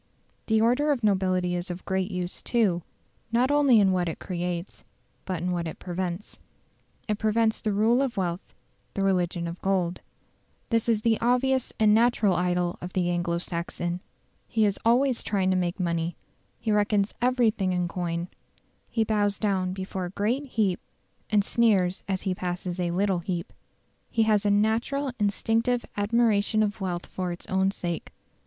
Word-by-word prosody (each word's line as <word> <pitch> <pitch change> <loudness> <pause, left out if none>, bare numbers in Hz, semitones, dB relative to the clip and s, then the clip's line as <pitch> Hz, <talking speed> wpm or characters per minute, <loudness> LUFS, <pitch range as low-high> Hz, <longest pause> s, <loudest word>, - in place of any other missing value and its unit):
The 220 -1 +3
order 250 +7 +3
of 255 -5 -1
nobility 185 -3 +2
is 175 +2 -3
of 175 +1 -6
great 190 0 -1
use, 180 -2 -4
too, 205 -8 +1 0.5
not 245 +4 +3
only 280 -6 +5
in 195 -2 +4
what 180 -2 +1
it 160 - -5
creates, 175 0 -4 0.4
but 180 -3 -3
in 180 - 0
what 170 -1 -1
it 160 - -6
prevents. 180 +1 -5 0.7
It 210 -1 -1
prevents 220 +1 +1
the 215 - 0
rule 220 +5 +3
of 265 -5 -2
wealth 180 -1 -3 0.4
the 195 - 0
religion 180 -3 +1
of 170 +1 -7
gold. 185 -3 0 0.7
This 230 0 +2
is 215 -2 +2
the 225 -1 +2
obvious 250 +2 +2
and 215 -1 +5
natural 225 -3 +4
idol 180 0 0
of 180 +1 -6
the 175 -1 +1
Anglo 175 -1 0
Saxon. 175 0 -3 0.5
He 220 -2 +2
is 200 -1 0
always 245 +2 +3
trying 190 -2 0
to - - +2
make 180 0 -1
money; 170 -1 -1 0.4
he 220 - -1
reckons 210 -1 +2
everything 235 -6 +2
in 180 -1 0
coin; 170 0 -3 0.6
he 225 - +1
bows 205 -2 +1
down 190 -3 0
before 190 0 -4
a - - -5
great 220 +9 -1
heap 215 -8 0 0.5
and 205 -1 +3
sneers 195 -6 +2
as 190 -2 -2
he 190 -2 0
passes 180 0 -4
a 175 -1 0
little 190 +1 +1
heap. 170 0 -4 0.6
He 225 - +2
has 210 -1 +2
a - - +4
"natural 225 +7 +1
instinctive 225 +4 +1
admiration 215 0 +2
of 205 0 -2
wealth 180 -2 -2
for 185 -1 -4
its 175 - -7
own 190 0 +1
sake". 175 -4 -4
195 Hz, 170 wpm, -26 LUFS, 180-220 Hz, 0.7 s, only